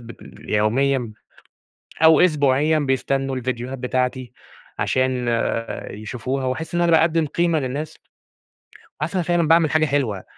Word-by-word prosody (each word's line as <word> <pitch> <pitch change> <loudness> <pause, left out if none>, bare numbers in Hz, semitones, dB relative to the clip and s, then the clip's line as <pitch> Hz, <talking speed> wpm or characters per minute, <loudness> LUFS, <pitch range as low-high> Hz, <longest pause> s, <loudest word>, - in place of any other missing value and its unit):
ب 115 -1 -12 0.4
يوميًا 120 +3 +1 0.9
أو 160 -1 +7
أسبوعيًا 150 -2 +3
بيستنوا 135 -1 -1
الڤيديوهات 125 +1 -4
بتاعتي، 125 0 -2 0.5
عشان 130 -1 0 0.6
يشوفوها، 125 +5 -4
وأحِس 130 +7 -3
إن 175 - +1
أنا 170 - +2
باقدّم 165 0 +3
قيمة 165 +2 0
للناس. 140 +4 -4 1.1
حاسس 155 +5 -2
إن - - +1
أنا - - 0
فعلًا 175 -2 +2
باعمل 165 -2 +4
حاجة 155 0 +3
حلوة، 130 -10 -1
135 Hz, 125 wpm, -21 LUFS, 125-160 Hz, 1.1 s, أو